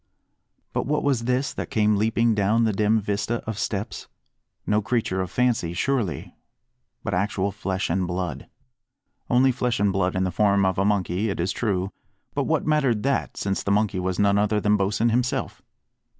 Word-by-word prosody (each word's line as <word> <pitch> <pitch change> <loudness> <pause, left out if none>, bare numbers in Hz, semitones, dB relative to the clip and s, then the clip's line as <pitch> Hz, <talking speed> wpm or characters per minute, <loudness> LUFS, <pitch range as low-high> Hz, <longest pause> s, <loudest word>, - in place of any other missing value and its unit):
But - - -1
what 150 +1 0
was 130 -5 +1
this 125 +3 0
that - - -5
came 105 -1 +2
leaping 115 +2 +2
down 105 +3 +2
the 110 -2 +2
dim 105 +2 +2
vista 105 +3 -1
of 110 -2 -4
steps? 105 +2 -3 0.6
No 105 +1 +2
creature 100 -3 -1
of 95 - -3
fancy 120 -9 0
surely, 105 - -1 0.7
but - - -3
actual 100 +1 0
flesh 95 -1 -2
and 90 +1 0
blood. 90 -4 -4 0.8
Only 130 +2 +4
flesh 125 -1 -1
and 100 -1 +2
blood 95 -2 0
in 95 - +1
the 95 - -1
form 100 +1 +3
of 95 -1 0
a 100 - +2
monkey, 100 0 0
it 100 - -3
is 90 +4 0
true, 100 -4 -1 0.4
but - - 0
what - - 0
mattered 135 -8 +2
that, 135 +1 -1
since 100 -1 -1
the - - -3
monkey 100 -1 +1
was 90 0 -2
none 100 0 +3
other 105 +1 +2
than 105 0 +3
Bosin 105 +3 +1
himself? 125 +2 -1
105 Hz, 180 wpm, -24 LUFS, 95-115 Hz, 0.8 s, Only